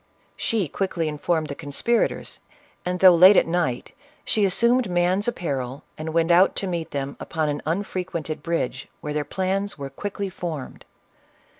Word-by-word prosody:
She 215 -7 0
quickly 170 0 -2
informed 155 +2 0
the 145 - -5
conspirators, 145 +13 -1 0.4
and, 180 0 -2
though 185 -1 +9
late 185 +4 +8
at - - +5
night, 165 -8 -1 0.3
she 210 -2 +2
assumed 235 +4 +3
man's 180 +3 +1
apparel, 140 - -3
and 155 +1 -5
went 165 +1 +2
out 180 +3 +5
to - - -2
meet 170 -3 -3
them 140 0 -4
upon 155 -2 -2
an 145 0 -2
unfrequented 170 -3 -3
bridge, 150 -6 -2
where 150 - -4
their 150 0 0
plans 190 +5 -2
were 140 -1 -6
quickly 200 -1 -4
formed. 165 -7 -6
170 Hz, 155 wpm, -24 LUFS, 150-190 Hz, 0.4 s, though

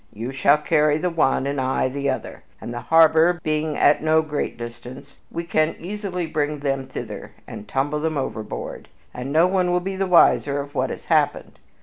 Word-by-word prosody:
You 115 +5 -6
shall 140 +2 +4
carry 150 -1 +2
the 180 +3 -1
one 135 -5 +1
and 140 -1 -1
I 130 0 0
the 140 +1 -2
other, 130 - -4 0.2
and, 120 - -7
the 120 - -4
harbor 165 +2 +4
being 155 -1 -1
at 145 - +4
no 160 +1 +3
great 150 -5 -3
distance, 120 +3 -10
we 170 - -4
can 155 -1 0
easily 190 -1 -4
bring 150 -1 -2
them 135 -2 -2
thither - - -7
and 105 - -9
tumble 145 +3 -1
them 155 0 -2
overboard, 110 -5 -5 0.3
and 125 +2 -5
no 160 +3 +5
one 180 -1 +1
will 180 - +2
be 190 +2 -4
the 190 0 -1
wiser 145 -5 +4
of 140 0 -7
what - - -1
has - - -7
happened. - - 0
150 Hz, 195 wpm, -22 LUFS, 135-165 Hz, 0.3 s, no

